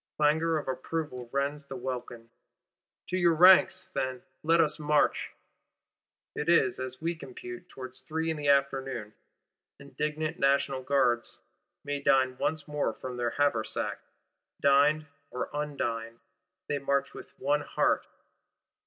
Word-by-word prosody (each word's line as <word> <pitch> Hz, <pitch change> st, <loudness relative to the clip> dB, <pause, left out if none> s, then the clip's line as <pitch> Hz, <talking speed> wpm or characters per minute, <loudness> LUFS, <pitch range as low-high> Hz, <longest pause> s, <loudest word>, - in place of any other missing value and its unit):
Clangour 160 Hz, +2 st, +3 dB
of 150 Hz, -, -5 dB
approval 130 Hz, -1 st, -4 dB
rends 140 Hz, +1 st, -1 dB
the 135 Hz, -, -7 dB
welkin. 120 Hz, -2 st, -6 dB, 0.8 s
To 185 Hz, -, 0 dB
your 170 Hz, -2 st, +4 dB
ranks, 185 Hz, +2 st, +6 dB
then; 130 Hz, -2 st, -2 dB, 0.2 s
let 165 Hz, +2 st, +3 dB
us 155 Hz, -1 st, +2 dB
march! 150 Hz, 0 st, +2 dB, 1.0 s
It 150 Hz, -, -3 dB
is, 170 Hz, 0 st, +4 dB
as 130 Hz, 0 st, -5 dB
we 170 Hz, +1 st, 0 dB
compute, 120 Hz, -5 st, -9 dB
towards 130 Hz, 0 st, -9 dB
three 160 Hz, +4 st, -2 dB
in 160 Hz, -, -3 dB
the 145 Hz, -1 st, -3 dB
afternoon. 135 Hz, -5 st, +1 dB, 0.7 s
Indignant 150 Hz, +3 st, -3 dB
National 140 Hz, -1 st, +2 dB
Guards 130 Hz, -3 st, +1 dB, 0.5 s
may 145 Hz, -1 st, -3 dB
dine 130 Hz, -2 st, +3 dB
for -, -, -17 dB
once 155 Hz, -2 st, 0 dB
from 135 Hz, -4 st, -3 dB
their 120 Hz, -1 st, 0 dB
haversack: 140 Hz, -6 st, 0 dB, 0.6 s
dined 145 Hz, +2 st, +4 dB, 0.2 s
or 125 Hz, -, -4 dB
undined, 120 Hz, -6 st, -3 dB, 0.5 s
they 145 Hz, -, -1 dB
march 140 Hz, 0 st, 0 dB
with -, -, -12 dB
one 145 Hz, +2 st, +1 dB
heart. -, -, 0 dB
140 Hz, 130 wpm, -29 LUFS, 130-150 Hz, 1.0 s, ranks